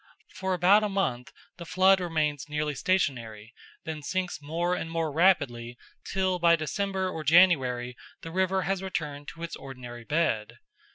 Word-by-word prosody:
For 190 -1 -2
about 190 +4 +5
a 210 - 0
month 150 -12 -2 0.3
the 175 - -8
flood 185 +2 +4
remains 155 -5 -1
nearly 150 0 -1
stationary, 120 - -1 0.3
then 155 -1 -5
sinks 185 +2 -3
more 170 +4 -1
and 165 - -3
more 165 -2 -2
rapidly, 135 -8 +1 0.3
till 185 -1 -1
by 170 -1 +5
December 190 +4 -2
or 160 -4 -5
January 135 -7 +4 0.3
the 165 - -7
river 190 +1 +1
has 195 0 -1
returned 150 -6 -4
to 165 +2 -9
its 170 - -5
ordinary 125 -3 -9
bed. 145 -7 -1
165 Hz, 155 wpm, -27 LUFS, 140-185 Hz, 0.3 s, about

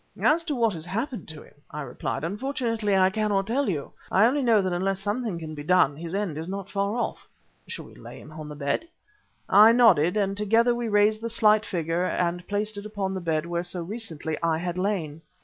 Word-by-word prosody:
"As 325 +2 +3
to 300 -4 -2
what 230 -4 +2
has 160 -2 -6
happened 230 - -4
to 155 -2 -9
him," - - -19 0.2
I 150 - -6
replied, 140 - -4
"unfortunately 225 - -1
I 185 0 +4
cannot 210 -2 0
tell 245 +3 0
you. 150 -7 -3 0.2
I 200 +4 +5
only 275 +5 +2
know 230 -4 +4
that 185 -1 -1
unless 190 +2 -1
something 205 -1 -2
can 160 -2 -7
be 150 - -7
done 150 -2 +3
his 165 +4 -6
end 190 -7 -2
is 160 - -6
not 195 +1 -6
far 200 +1 -1
off." 240 - -3 0.4
"Shall - - -6
we - - -15
lay - - -11
him 155 - -13
on 155 -1 -8
the 150 - -7
bed?" 145 - -2 0.6
I 215 +3 +7
nodded, 195 -7 +5
and 195 -1 0
together 225 +4 +3
we 240 -1 -3
raised 210 +1 +3
the 230 - -3
slight 215 -2 +3
figure 170 0 -1
and 175 -1 -1
placed 205 +1 -2
it 205 - -7
upon 200 -3 -3
the 190 - -4
bed 160 -2 -1
where 170 0 -2
so 175 0 -5
recently 165 -6 -5
I 165 -1 +1
had 175 +1 -3
lain. 180 -5 -2
195 Hz, 220 wpm, -26 LUFS, 170-220 Hz, 0.6 s, I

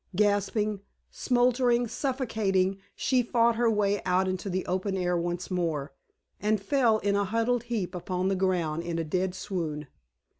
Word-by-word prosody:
Gasping, 205 0 +1 0.3
smothering, 245 -1 +2
suffocating, 215 -7 0 0.2
she 255 -2 +2
fought 235 -1 +2
her 235 0 +2
way 205 -2 +1
out 185 +1 +2
into 185 +1 -3
the 185 0 -2
open 190 +2 -1
air 180 -1 0
once 175 +2 -3
more, 160 -5 -1 0.5
and 210 0 +1
fell 230 +1 +2
in 200 -1 0
a 200 0 +1
huddled 230 +3 0
heap 215 -7 -2
upon 180 +1 -2
the 195 - +1
ground 175 -4 0
in 170 -1 -3
a 165 - 0
dead 180 +3 -1
swoon. 165 -6 -4
195 Hz, 155 wpm, -28 LUFS, 180-225 Hz, 0.5 s, smothering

